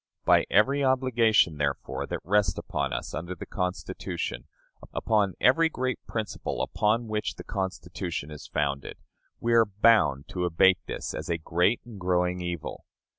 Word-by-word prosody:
By -, -, +5 dB
every 140 Hz, +7 st, +3 dB
obligation, 120 Hz, -, +3 dB
therefore, 70 Hz, -1 st, -2 dB
that -, -, -4 dB
rests 100 Hz, +1 st, +2 dB
upon -, -, -2 dB
us -, -, -4 dB
under 85 Hz, +3 st, -4 dB
the -, -, -8 dB
Constitution, 90 Hz, -9 st, -4 dB, 0.4 s
upon 105 Hz, -4 st, +1 dB
every 165 Hz, +6 st, +4 dB
great 130 Hz, -4 st, -2 dB
principle 110 Hz, -4 st, -3 dB
upon 110 Hz, +3 st, +1 dB
which 110 Hz, -1 st, -2 dB
the -, -, -9 dB
Constitution 90 Hz, -5 st, -4 dB
is 75 Hz, -, -9 dB
founded, 70 Hz, -2 st, -2 dB, 0.4 s
we 120 Hz, 0 st, 0 dB
are 115 Hz, -2 st, +5 dB
bound 100 Hz, -, +3 dB
to 90 Hz, -1 st, -2 dB
abate 90 Hz, +2 st, +4 dB
this -, -, -4 dB
as -, -, -5 dB
a 85 Hz, -, +1 dB
great 90 Hz, +7 st, +1 dB
and 115 Hz, -4 st, -10 dB
growing 90 Hz, 0 st, +1 dB
evil. 85 Hz, -2 st, -5 dB
95 Hz, 150 wpm, -27 LUFS, 85-115 Hz, 0.4 s, By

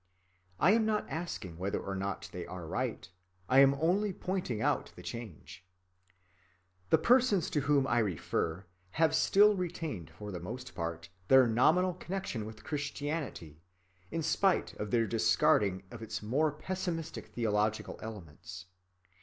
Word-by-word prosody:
I 175 Hz, -, +5 dB
am 225 Hz, +1 st, +4 dB
not 215 Hz, -1 st, 0 dB
asking 100 Hz, -, -5 dB
whether 95 Hz, +2 st, -1 dB
or 100 Hz, -, -5 dB
not 95 Hz, +1 st, -3 dB
they 90 Hz, -, -5 dB
are 90 Hz, -1 st, -7 dB
right, 80 Hz, -, -3 dB, 0.4 s
I 130 Hz, -, +5 dB
am 135 Hz, 0 st, +7 dB
only 185 Hz, +8 st, +1 dB
pointing 180 Hz, -, -3 dB
out -, -, 0 dB
the -, -, -11 dB
change. 115 Hz, -8 st, -8 dB, 1.3 s
The -, -, +6 dB
persons 235 Hz, 0 st, +3 dB
to 150 Hz, -, +1 dB
whom 140 Hz, -1 st, +3 dB
I 120 Hz, -2 st, +2 dB
refer 95 Hz, -2 st, -1 dB, 0.3 s
have 160 Hz, 0 st, +3 dB
still 210 Hz, +2 st, +5 dB
retained 165 Hz, -, -4 dB
for 105 Hz, +5 st, -8 dB
the 90 Hz, -, -5 dB
most 125 Hz, +9 st, -7 dB
part 85 Hz, 0 st, -5 dB, 0.2 s
their 130 Hz, +2 st, +7 dB
nominal 155 Hz, +11 st, +3 dB
connection 175 Hz, -, -4 dB
with 110 Hz, -1 st, -11 dB
Christianity, 145 Hz, -, -4 dB, 0.5 s
in 165 Hz, -, -3 dB
spite 190 Hz, +4 st, +2 dB
of 105 Hz, -, -3 dB
their 115 Hz, +1 st, +2 dB
discarding 100 Hz, -3 st, +2 dB
of 120 Hz, -, -9 dB
its 110 Hz, -1 st, -5 dB
more 145 Hz, +8 st, +1 dB
pessimistic 165 Hz, 0 st, -4 dB
theological 110 Hz, -2 st, -1 dB
elements. 95 Hz, -3 st, -9 dB
120 Hz, 145 wpm, -32 LUFS, 100-165 Hz, 1.3 s, am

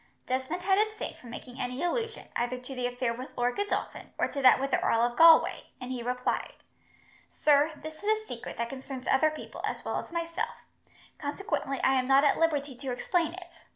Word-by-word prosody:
Desmond 260 Hz, +8 st, -2 dB
had 385 Hz, +1 st, +3 dB
abstained 430 Hz, 0 st, -1 dB
from 245 Hz, -, -13 dB
making 245 Hz, +2 st, -9 dB
any 250 Hz, +5 st, -3 dB
allusion, 450 Hz, +5 st, -2 dB
either 245 Hz, +1 st, -1 dB
to 250 Hz, +2 st, -8 dB
the 250 Hz, -1 st, -1 dB
affair 245 Hz, -1 st, -1 dB
with 255 Hz, +3 st, -7 dB
Lord 245 Hz, 0 st, +1 dB
Godolphin, 405 Hz, 0 st, -3 dB
or -, -, +2 dB
to 280 Hz, -, -4 dB
that 255 Hz, -1 st, +7 dB
with 275 Hz, 0 st, -2 dB
the -, -, +3 dB
Earl 230 Hz, -, +3 dB
of 240 Hz, 0 st, +1 dB
Galway, 330 Hz, +2 st, +6 dB
and 250 Hz, 0 st, -6 dB
he 250 Hz, -2 st, -3 dB
replied: 250 Hz, +1 st, -2 dB, 0.8 s
"Sir, 295 Hz, +1 st, +3 dB
this 315 Hz, +1 st, -9 dB
is 430 Hz, +1 st, +1 dB
a -, -, -16 dB
secret 235 Hz, -, -7 dB
that 235 Hz, -, -1 dB
concerns 265 Hz, 0 st, -7 dB
other 270 Hz, +4 st, +4 dB
people, 310 Hz, -, -8 dB
as -, -, -3 dB
well -, -, -1 dB
as -, -, -9 dB
myself, 335 Hz, +7 st, -3 dB, 0.5 s
consequently 285 Hz, -, -2 dB
I 265 Hz, -, +4 dB
am 255 Hz, -, -2 dB
not 270 Hz, +1 st, +6 dB
at 290 Hz, -, +3 dB
liberty 290 Hz, -5 st, +1 dB
to 265 Hz, 0 st, -4 dB
explain 335 Hz, +6 st, 0 dB
it. 350 Hz, -3 st, -12 dB
275 Hz, 205 wpm, -29 LUFS, 250-335 Hz, 0.8 s, that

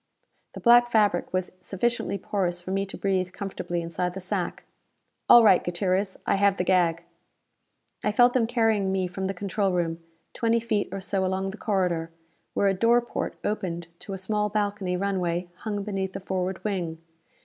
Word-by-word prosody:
The -, -, -7 dB
black 240 Hz, 0 st, +6 dB
fabric 210 Hz, -6 st, +2 dB
was 185 Hz, -1 st, -1 dB
sufficiently 215 Hz, +2 st, -1 dB
porous 180 Hz, -2 st, -1 dB
for 180 Hz, +1 st, -7 dB
me 195 Hz, +1 st, 0 dB
to -, -, -8 dB
breathe 185 Hz, -2 st, 0 dB
comfortably 175 Hz, -3 st, -4 dB
inside 175 Hz, +2 st, -3 dB
the -, -, -4 dB
sack. 185 Hz, -, -3 dB, 0.7 s
"All 240 Hz, -, +9 dB
right, 195 Hz, -5 st, +6 dB
Gutierrez, 185 Hz, +2 st, 0 dB
I -, -, +2 dB
have 200 Hz, 0 st, +3 dB
the -, -, +1 dB
gag." 175 Hz, -3 st, +2 dB, 1.0 s
I 210 Hz, -, +2 dB
felt 245 Hz, +3 st, +5 dB
them 235 Hz, -3 st, +2 dB
carrying 225 Hz, -5 st, +2 dB
me 190 Hz, -1 st, 0 dB
from 190 Hz, +2 st, -3 dB
the 195 Hz, -, -3 dB
control 200 Hz, +1 st, -1 dB
room, 165 Hz, -2 st, -1 dB, 0.3 s
twenty 230 Hz, 0 st, +2 dB
feet 220 Hz, -3 st, -1 dB
or 195 Hz, -, -4 dB
so 195 Hz, 0 st, -1 dB
along 190 Hz, +1 st, -1 dB
the 205 Hz, -, -10 dB
corridor, 180 Hz, -7 st, 0 dB, 0.5 s
where 200 Hz, -, +3 dB
a 195 Hz, -, +3 dB
door 230 Hz, +5 st, +4 dB
porte 240 Hz, -, -4 dB
opened 175 Hz, -5 st, -3 dB
to 200 Hz, -, -7 dB
a -, -, -3 dB
small 210 Hz, +2 st, -1 dB
balcony 205 Hz, -3 st, -1 dB
runway 180 Hz, -2 st, -1 dB
hung 205 Hz, -1 st, -3 dB
beneath 195 Hz, -2 st, -3 dB
the 195 Hz, -, -4 dB
forward 190 Hz, 0 st, -3 dB
wing. 180 Hz, -6 st, -2 dB
195 Hz, 180 wpm, -26 LUFS, 180-210 Hz, 1.0 s, All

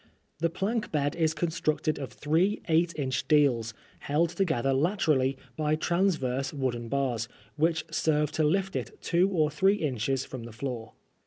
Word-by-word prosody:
The 165 Hz, +1 st, +2 dB
plank 210 Hz, +7 st, -2 dB
bed 145 Hz, -2 st, 0 dB
is 160 Hz, -1 st, +1 dB
constructed 155 Hz, -2 st, 0 dB
of 135 Hz, -, -5 dB
three 170 Hz, +8 st, +1 dB
eight 165 Hz, +1 st, +3 dB
inch 130 Hz, -2 st, -1 dB
deals, 125 Hz, -7 st, +3 dB, 0.2 s
held 160 Hz, +4 st, +1 dB
together 160 Hz, -8 st, +1 dB
laterally 140 Hz, -4 st, +2 dB, 0.2 s
by 155 Hz, +1 st, +1 dB
transverse 155 Hz, -7 st, 0 dB
wooden 125 Hz, -5 st, -2 dB
bars, 125 Hz, -5 st, 0 dB, 0.3 s
which 160 Hz, +1 st, +1 dB
serve 150 Hz, -2 st, +1 dB
to 160 Hz, -, 0 dB
lift 190 Hz, +5 st, +1 dB
it -, -, -4 dB
two 180 Hz, +3 st, +3 dB
or 160 Hz, -5 st, +1 dB
three 195 Hz, +1 st, +3 dB
inches 135 Hz, -, -1 dB
from 125 Hz, -3 st, -7 dB
the 120 Hz, -, -9 dB
floor. 115 Hz, -1 st, -5 dB
150 Hz, 155 wpm, -28 LUFS, 130-170 Hz, 0.3 s, eight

